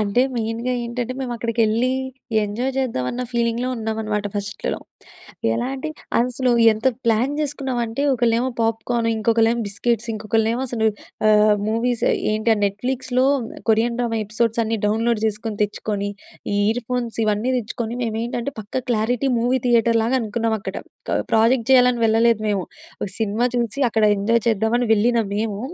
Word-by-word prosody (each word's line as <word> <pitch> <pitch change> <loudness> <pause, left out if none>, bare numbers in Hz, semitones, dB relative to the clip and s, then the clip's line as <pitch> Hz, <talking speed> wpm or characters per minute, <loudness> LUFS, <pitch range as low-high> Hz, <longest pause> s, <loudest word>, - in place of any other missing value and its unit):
అంటే 215 +4 +2
మెయిన్‌గ 225 +1 -2
ఏంటంటే 240 +1 -3
మేము 255 -2 -3
అక్కడికెళ్ళి 230 +1 +1 0.5
ఎంజాయ్ 225 +6 -2
చేద్దాం 255 - -1
అన్న 250 - -3
ఫీలింగ్‌లో 235 0 0
ఉన్నామనమాట 220 -2 -2
ఫస్ట్‌లో. 205 0 -3 0.8
ఎలాంటే 270 - -3 0.3
అసలు 250 +1 0 0.2
ఎంత 220 +3 -3 0.2
ప్లాన్ 230 +5 +2
చేసుకున్నామంటే 265 -4 -2
ఒకళ్ళేమో 240 0 +2
పాప్కార్న్ 230 +1 0
ఇంకొకళ్ళేమో 225 +1 +2
బిస్కెట్స్ 220 +3 -1
ఇంకొకళ్ళేమో 225 +3 0
అసలు 225 -2 0 0.4
ఆహ్, 210 0 +5
మూవీస్ 230 +2 0 0.3
ఏంటి 215 +1 +2
ఆ - - -5
నెట్‌ఫ్లిక్స్‌లో 250 +5 0 0.5
కొరియన్ 230 +2 +2
డ్రామా 230 -2 0
ఎపిసోడ్స్ 225 +2 0
అన్నీ 225 0 -1
డౌన్లోడ్ 225 +1 +1
చేసుకొని 215 0 -3
తెచ్చుకొని 205 -1 -2 0.4
ఈ - - +1
ఇయర్ 245 +2 0
ఫోన్స్ 245 -2 -2
ఇవన్నీ 215 +4 +1
తెచ్చుకొని 235 +1 -4
మేమేంటంటే 235 +3 -2
పక్కా 210 +5 -4
క్లారిటీ 240 +4 +1
మూవీ 250 +3 +1
థియేటర్ 230 -1 +4
లాగా 245 +3 +1
అనుకున్నాం 225 +1 -1
అక్కడ - - -5 0.3
క - - +1
ప్రాజెక్ట్ 230 +2 +3
చేయాలని 250 -2 +5
వెళ్ళలేదు 225 0 +3
మేము. 200 -3 0 0.4
ఒక 195 - -3
సినిమా 220 +2 0
చూసి 235 +1 -1
అక్కడ 220 0 +2
ఎంజాయ్ 230 +3 +2
చేద్దామని 225 +3 +1
వెళ్ళిన 235 +3 +2 0.2
మేము. 210 -1 -2
230 Hz, 140 wpm, -21 LUFS, 220-245 Hz, 0.8 s, ఆహ్